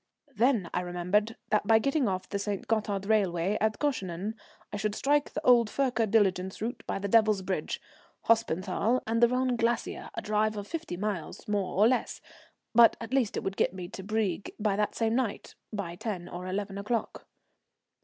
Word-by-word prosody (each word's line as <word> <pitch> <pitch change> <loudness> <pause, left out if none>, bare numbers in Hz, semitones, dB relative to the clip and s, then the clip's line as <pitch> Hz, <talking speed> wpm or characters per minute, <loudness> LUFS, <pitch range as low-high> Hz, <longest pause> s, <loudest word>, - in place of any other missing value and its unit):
Then 230 -5 +2
I - - +1
remembered 180 +5 0 0.2
that 210 -1 +2
by 225 - +7
getting 275 +2 +1
off 185 -1 -2
the 200 - -3
St. 200 -1 -3
Gothard 210 -3 0
railway 195 -3 +1
at 215 0 +1
Goeschenen 200 - -2 0.4
I - - -2
should 205 0 -1
strike 290 +3 +2
the 310 - -5
old 235 -3 +6
Furka 245 -5 0
diligence 190 -3 +2
route 235 +4 -4
by - - -1
the 200 +1 -3
Devil's 215 -2 +4
Bridge, 190 0 -2 0.4
Hospenthal, 220 +2 +1
and 230 +1 0
the 235 - +8
Rhone 250 +1 +1
Glacier, 230 +1 -1
a - - -3
drive 215 0 +1
of 205 - -4
fifty 255 - -5
miles, 195 -4 -4
more 200 -3 -1
or 210 +3 +6
less, 255 +1 0 0.5
but 230 0 +7
at 230 +2 -7
least 255 -6 +1
it - - -2
would 195 0 -3
get 185 - +1
me 180 -2 -6
to 190 - -8
Brieg 205 -2 -1
that 210 -1 0
same 225 -1 +1
night 240 -4 -2 0.2
by 185 -5 -4
10 185 -4 -4
or 180 +1 -6
11 195 +1 -3
o'clock. 220 +3 -3
210 Hz, 185 wpm, -29 LUFS, 195-230 Hz, 0.5 s, the